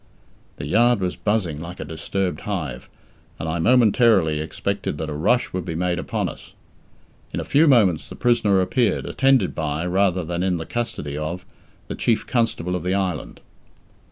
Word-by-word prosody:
The - - -5
yard 120 +8 +3
was 90 -2 -2
buzzing 100 -8 -1
like 85 +2 -8
a - - -5
disturbed 90 +1 -3
hive, 75 -12 -5 0.5
and 80 - -5
I 85 +2 -1
momentarily 110 - +4
expected 80 +2 -3
that 80 0 -4
a - - -3
rush 120 +12 +1
would 90 -1 -2
be 85 -3 -5
made 90 0 0
upon - - -2
us. - - -10 0.8
In - - -2
a - - -2
few 155 +3 +3
moments 105 - +3
the - - -8
prisoner 110 -6 +3
appeared, 110 +3 +1
attended 135 -7 +2
by, 80 +1 -2
rather 90 0 +1
than 85 +1 -3
in 90 -1 +1
the 80 - -5
custody 115 -12 -4
of, 85 +4 -4 0.4
the - - -4
Chief 115 -2 0
Constable 110 -7 0
of 90 - -2
the 90 +3 0
island. 95 -5 -3
90 Hz, 175 wpm, -22 LUFS, 80-110 Hz, 0.8 s, momentarily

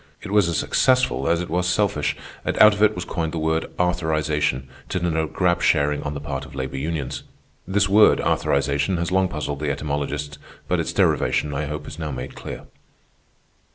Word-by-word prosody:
It - - -6
was 105 -4 +4
as 85 - 0
successful 130 - +2
as 85 +1 +2
it 90 - -5
was 90 +1 +1
selfish, 90 -5 +1 0.3
and - - -2
out 105 0 +8
of 100 - -4
it 105 0 +4
was 90 - -4
coined 80 -2 -3
the - - -3
word 80 +1 0
"arthurization," 75 -6 0 0.3
to 90 - -1
denote 80 -2 -1
grab 90 -2 +1
sharing 75 -1 +2
on 75 0 -4
the - - -4
part 70 -2 -4
of 70 - -11
labor 65 0 -4
unions. 75 -2 -3 0.5
This 100 +2 +2
word 105 +2 +6
"arthurization" 70 +5 +1
has 85 +1 -2
long 95 0 +3
puzzled 75 -4 -4
the 75 -1 -1
etymologists, 75 0 -3 0.3
but - - +1
its - - -2
derivation, 75 -1 +1
I 75 +2 -2
hope, 75 +1 -5
is 80 - -8
now 80 -2 -3
made 65 -3 -6
clear. - - -7
80 Hz, 190 wpm, -23 LUFS, 70-90 Hz, 0.5 s, out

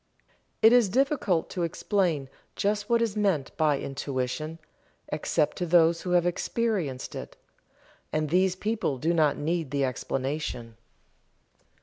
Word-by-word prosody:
It 225 +2 +8
is 240 -5 +5
difficult 255 - +1
to 180 - -3
explain 170 -3 0 0.3
just 205 0 -1
what 235 0 +3
is 220 -3 -2
meant 195 -10 0
by 150 -3 +2
Intuition, 140 +3 -3 0.5
except 150 0 0
to 180 - -2
those 165 0 +4
who 180 - -5
have 175 -1 +4
experienced 175 - -1
it - - -8 0.7
and 155 -1 -1
these 185 +1 +3
people 210 -8 -1
do 160 +7 0
not 155 -4 +3
need 160 0 -1
the 140 0 0
explanation. 130 -2 -3
165 Hz, 130 wpm, -27 LUFS, 145-200 Hz, 0.7 s, It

